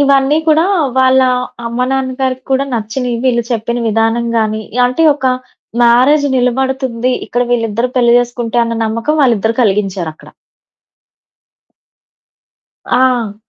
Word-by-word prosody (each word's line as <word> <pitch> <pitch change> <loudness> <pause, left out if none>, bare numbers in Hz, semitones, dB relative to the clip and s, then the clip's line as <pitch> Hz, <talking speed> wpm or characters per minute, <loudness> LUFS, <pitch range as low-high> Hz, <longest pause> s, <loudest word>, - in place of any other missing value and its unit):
ఇవన్నీ 280 +1 +3
కూడా 315 +1 +3 0.3
వాళ్ళ 260 0 +4 0.5
అమ్మా, 235 +2 -1
నాన్నగారికి 260 -1 -2
కూడా 270 +1 +1
నచ్చినయి. 235 +2 -3
వీళ్ళు 240 -2 +2
చెప్పిన 235 +1 -2
విధానం 225 +2 0
గాని, 220 -1 -1 0.2
అంటే 255 +6 -1
ఒక 265 -2 -3 0.6
మ్యారేజ్ 255 +5 +4
నిలబడుతుంది. 255 -1 -1
ఇక్కడ 245 +1 -1
వీళ్ళిద్దరూ 230 +1 -1
పెళ్లి 240 -1 +4
చేసుకుంటే 240 -1 -2
అన్న 230 0 -3
నమ్మకం 230 +7 -1
వాళ్ళిద్దరూ 230 -4 +2
కలిగించారక్కడ. 195 -6 -2 2.6
ఆ! 245 -5 +1
245 Hz, 105 wpm, -14 LUFS, 230-260 Hz, 2.6 s, వాళ్ళ